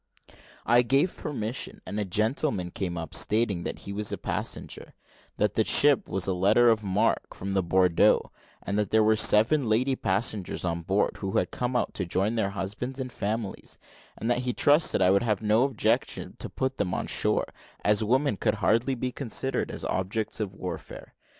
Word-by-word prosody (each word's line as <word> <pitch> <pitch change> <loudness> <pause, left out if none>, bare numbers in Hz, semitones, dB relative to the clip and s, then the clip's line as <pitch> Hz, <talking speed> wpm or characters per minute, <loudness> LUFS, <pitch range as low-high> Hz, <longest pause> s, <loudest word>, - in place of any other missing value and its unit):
I 120 +1 +5
gave 135 +9 +1
permission, 125 -4 -4
and 105 - -4
a 105 - -1
gentleman 105 - 0
came 90 -2 -4
up, 80 -2 -6
stating 105 -4 +1
that - - -5
he 100 - -7
was 105 +1 -2
a - - -3
passenger; - - -5 0.4
that - - +1
the - - +2
ship 145 -2 +3
was 95 0 0
a 95 - +1
letter 105 +6 +4
of 110 -1 0
marque, 95 -2 0
from 100 +1 -5
Bordeaux; 90 -2 +3 0.3
that 100 -1 -1
there 110 0 +4
were 110 +1 +4
seven 115 +5 +3
lady 130 +5 +2
passengers 100 -3 -2
on 85 -1 -2
board, 95 +4 0
who 95 +2 -2
had - - 0
come 125 0 -3
out 120 - 0
to 95 - -3
join 95 +5 0
their 110 -4 0
husbands 105 +7 -5
and 130 -1 -4
families; 105 -1 -4 0.4
and 115 - -4
that 120 - +2
he 125 -1 -2
trusted 145 - +4
I 90 - +5
would 100 - +3
have 110 -3 -1
no 110 +4 +3
objection 135 -6 -1
to - - -6
put 130 0 -3
them 95 -3 -1
on - - -2
shore, - - 0 0.4
as 105 +1 +3
women 130 +1 +1
could 110 +1 0
hardly 115 +7 +1
be 125 +1 -3
considered 135 +1 -2
as - - -6
objects 100 +5 -2
of 100 -3 -4
warfare. 90 -2 -8
110 Hz, 185 wpm, -27 LUFS, 95-125 Hz, 0.4 s, I